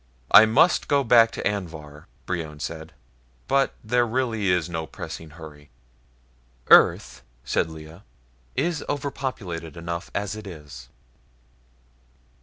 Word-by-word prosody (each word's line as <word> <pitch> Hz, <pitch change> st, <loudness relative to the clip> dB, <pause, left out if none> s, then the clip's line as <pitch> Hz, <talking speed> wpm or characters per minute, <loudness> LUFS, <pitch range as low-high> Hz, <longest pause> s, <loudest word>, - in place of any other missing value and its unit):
"I 110 Hz, -, +9 dB
must 115 Hz, +11 st, +3 dB
go 140 Hz, -1 st, +2 dB
back 115 Hz, -2 st, +6 dB
to -, -, -2 dB
Anvhar," 80 Hz, -7 st, -6 dB, 0.2 s
Brion 80 Hz, -4 st, -4 dB
said, 80 Hz, +2 st, -6 dB, 0.6 s
"but 135 Hz, 0 st, +1 dB
there 120 Hz, +2 st, +2 dB
really 115 Hz, -4 st, -1 dB
is 90 Hz, -3 st, +1 dB
no 80 Hz, -2 st, -5 dB
pressing 80 Hz, +3 st, -8 dB
hurry." 75 Hz, -2 st, -13 dB, 1.0 s
"Earth," -, -, +5 dB, 0.2 s
said -, -, 0 dB
Lea, 80 Hz, +2 st, -11 dB, 0.5 s
"is 170 Hz, -2 st, -1 dB
overpopulated 120 Hz, -, -4 dB
enough 85 Hz, +1 st, -5 dB
as 100 Hz, 0 st, -2 dB
it 110 Hz, -1 st, -9 dB
is." 75 Hz, -8 st, -11 dB
90 Hz, 115 wpm, -24 LUFS, 80-115 Hz, 1.0 s, I